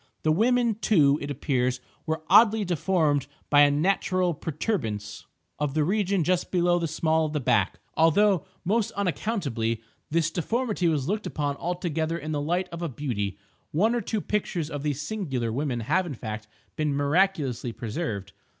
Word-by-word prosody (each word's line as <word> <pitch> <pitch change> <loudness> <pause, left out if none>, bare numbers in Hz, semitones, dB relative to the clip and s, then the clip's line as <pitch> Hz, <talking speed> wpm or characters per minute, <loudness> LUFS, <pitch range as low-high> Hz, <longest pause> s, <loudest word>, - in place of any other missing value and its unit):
The 155 - +3
women, 235 +6 +3
too, 145 -8 +4
it 145 - -4
appears, 130 -3 0 0.3
were 160 0 -2
oddly 215 +2 +6
deformed 160 -5 +1 0.2
by 145 0 +7
a 145 - +7
natural 180 +3 +1
protuberance 120 - -3 0.3
of 145 -1 -1
the 155 - +3
region 195 +1 +1
just 180 +2 0
below 175 -1 +2
the 165 - -1
small 160 0 +1
of 150 - -6
the 150 - 0
back—although, 165 +7 +2 0.2
most 215 +3 +1
unaccountably, 165 - -1 0.3
this 165 +1 +1
deformity 210 +2 0
was 150 -4 0
looked 210 +3 -1
upon 145 -2 -2
altogether 165 -2 -2
in 155 -1 -5
the 145 -1 -1
light 175 +5 0
of 170 0 -7
a 170 - -2
beauty. 110 -8 -3 0.3
One 210 +9 +2
or 240 - 0
two 220 -2 -2
pictures 175 -7 -2
of 145 - -4
these 145 -2 -2
singular 140 - -2
women 130 -1 -1
have 175 +10 +1
in 145 - -5
fact, 110 -1 -6 0.3
been 150 -2 0
miraculously 145 -4 +1
preserved. 110 - -4
160 Hz, 160 wpm, -26 LUFS, 140-185 Hz, 0.3 s, by